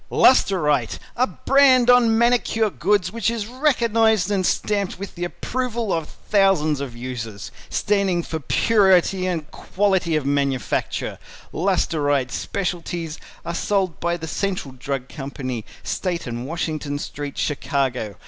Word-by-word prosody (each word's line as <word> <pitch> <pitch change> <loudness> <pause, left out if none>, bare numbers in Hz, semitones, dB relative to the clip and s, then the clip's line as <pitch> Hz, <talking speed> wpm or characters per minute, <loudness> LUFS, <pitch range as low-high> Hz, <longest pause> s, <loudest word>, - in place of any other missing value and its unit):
] - - -36
"LUSTR 195 - +4
ITE" 135 -7 +1 0.2
A 255 +2 +2
brand 265 -3 +4
on 240 -2 +5
Manicure 230 -2 +2
Goods 195 -2 +1
which 230 +1 0
is 230 -3 -2
recognized 225 - +2
and 195 -2 +1
stamped 200 +1 0
with 200 +1 -7
the 175 - -5
approval 235 +2 -2
of 165 -2 -1
its - - -15
thousands 175 -8 +3
of 130 -4 -5
users. 115 -7 -6 0.2
Standing 195 -4 +1
for 160 - -4
purity 190 - +3
and 165 -5 -3
quality 190 -4 0
of 150 -3 0
manufacture. 140 -2 -1 0.3
LUSTR 165 -5 0
ITE 135 -3 +1
Specialties 175 -4 -3 0.3
are 170 - -3
sold 190 -1 0
by 170 0 0
The 160 - -6
Central 185 -6 -2
Drug 130 0 -4
Company, 135 -5 -5 0.2
State 180 -3 -2
and 120 0 -5
Washington 155 -3 -3
St., 145 -1 -6
Chicago. 130 -7 -1
175 Hz, 140 wpm, -22 LUFS, 145-205 Hz, 0.3 s, on